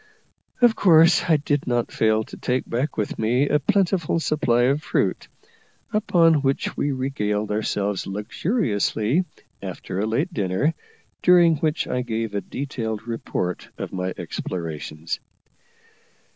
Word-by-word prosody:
Of 235 -2 +6
course 170 -1 +5
I 160 - +6
did 145 0 -1
not 120 -1 0
fail 110 0 +2
to - - -11
take 125 +1 -1
back 130 +5 -2
with 105 - -2
me 125 +6 +2
a 150 - +2
plentiful 175 0 +1
supply 140 -6 +1
of 140 +4 +2
fruit, - - -1 0.7
upon 170 -7 +4
which 135 0 -1
we 145 - 0
regaled 105 -6 -2
ourselves 105 -2 -1
luxuriously 110 - 0 0.4
after 95 - -5
a 105 - 0
late 145 +11 -1
dinner, 105 - 0 0.5
during 175 -3 +6
which 155 +1 0
I 125 - -1
gave 115 -3 -3
a 100 - -1
detailed 115 -6 -4
report 95 -6 -3
of - - -6
my 95 0 -2
explorations. 80 -2 -5
125 Hz, 130 wpm, -23 LUFS, 105-155 Hz, 0.7 s, Of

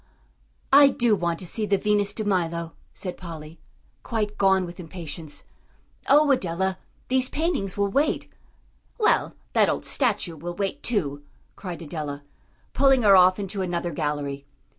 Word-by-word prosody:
"I 285 0 +9
do 240 -5 +2
want 170 -3 -1
to - - -5
see 215 +4 -1
the 200 0 +3
Venus 205 0 +1
de 215 - -3
Milo," 170 -4 -1 0.2
said 180 -2 -5
Polly, 160 -2 -9 0.4
quite 210 -3 -2
gone 190 -2 +3
with 175 +1 -10
impatience. 165 -3 -7 0.7
"Oh, 295 +1 +6
Adela, 190 -5 0 0.3
these 255 0 +2
paintings 290 - -2
will 200 0 +1
wait." 280 +9 0 0.7
"Well, 430 - +2 0.2
that - - +4
old - - -2
statue 170 -3 0
will 175 +3 -6
wait, 195 0 -3
too," 145 - -1 0.3
cried 175 -3 -7
Adela, 145 -2 -5 0.5
pulling 270 -2 +4
her 200 -2 +7
off 185 0 +6
into 200 -1 -3
another 175 -1 -2
gallery. 145 -2 -3
185 Hz, 145 wpm, -25 LUFS, 165-210 Hz, 0.7 s, I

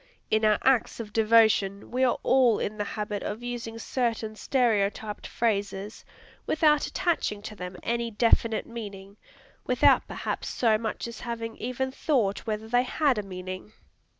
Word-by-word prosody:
In 220 0 +3
our 215 -1 +4
acts 260 -3 +2
of 210 -2 -7
devotion, 220 -3 +3
we 255 +2 +1
are 250 - +3
all 255 -4 +4
in 215 - -3
the - - +1
habit 210 -1 -4
of 215 +4 -5
using 235 -2 -5
certain 230 -2 -2
stereotyped 215 -4 0
phrases, 205 -2 -2 0.4
without 305 -1 +3
attaching 210 - -1
to 215 - -7
them 180 -1 -7
any 235 0 -1
definite 230 0 +2
meaning, 200 -4 -8 0.5
without - - +4
perhaps - - -4
so 225 -3 +2
much 225 +1 -3
as 235 - -8
having 230 -1 -5
even 255 +2 -3
thought 240 -8 0
whether 215 0 -3
they 245 +2 +3
had 255 -1 +1
a - - 0
meaning. 185 +1 -7
225 Hz, 150 wpm, -27 LUFS, 205-240 Hz, 0.5 s, our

